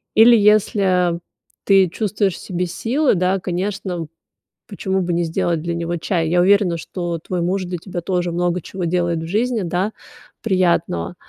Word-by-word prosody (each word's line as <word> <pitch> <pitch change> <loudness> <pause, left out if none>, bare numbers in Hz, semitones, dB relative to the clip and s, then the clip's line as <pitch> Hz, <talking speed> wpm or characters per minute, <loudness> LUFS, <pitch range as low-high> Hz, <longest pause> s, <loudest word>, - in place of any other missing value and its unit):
Или 230 +2 +8
если 195 -5 +3 0.5
ты 195 -3 +5
чувствуешь 200 -1 -1
в - - -9
себе 180 -1 -3
силы, 250 - +1
да, 185 +2 +1
конечно, 180 -2 -3 0.6
почему 190 -3 -2
бы 175 -1 -1
не 170 +1 +1
сделать 165 0 -1
для 170 0 -2
него 170 0 -2
чай? 165 -1 -1
Я 175 +1 +3
уверена, 190 -2 +3
что 175 +2 -4
твой 175 +2 -3
муж 185 +3 0
для 180 0 -4
тебя 175 0 -6
тоже 175 0 -1
много 175 0 0
чего 185 +2 -6
делает 175 -1 0
в 165 - -6
жизни, 225 +4 0
да, 180 +4 -1 0.5
приятного. 175 - 0
180 Hz, 165 wpm, -20 LUFS, 170-195 Hz, 0.6 s, Или